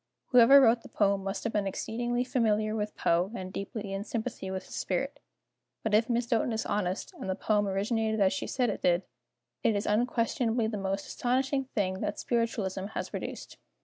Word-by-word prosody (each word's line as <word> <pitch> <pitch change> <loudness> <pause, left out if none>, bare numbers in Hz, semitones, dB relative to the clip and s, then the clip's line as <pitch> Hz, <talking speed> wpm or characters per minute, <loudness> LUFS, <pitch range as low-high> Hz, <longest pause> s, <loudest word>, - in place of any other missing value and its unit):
Whoever 250 +2 +8
wrote 235 -3 +5
the - - -13
poem 200 -2 +1
must 195 0 -3
have 225 - -2
been 205 -2 +1
exceedingly 240 +5 -1
familiar 215 -4 +1
with 210 -1 -3
Poe, 175 +4 +2
and 185 -2 -6
deeply 200 0 -5
in 195 +1 -3
sympathy 225 -3 -4
with 190 0 -4
his - - -12
spirit. 275 +10 -2 0.6
But 220 - -1
if 225 +3 +4
Miss 240 0 +1
Doten 235 0 +1
is 220 - -2
honest, 190 -3 -2
and - - -5
the 190 - 0
poem 205 0 +1
originated 220 +3 0
as 190 -2 +4
she 190 - -3
said 245 -4 +1
it - - -6
did, 175 +1 +3 0.6
it 225 - +2
is 205 - -1
unquestionably 230 +1 +1
the 220 0 -2
most 195 0 -2
astonishing 265 +2 0
thing 190 -2 0
that - - -2
Spiritualism 215 -5 -1
has - - -3
produced. - - -6
215 Hz, 190 wpm, -29 LUFS, 195-235 Hz, 0.6 s, Whoever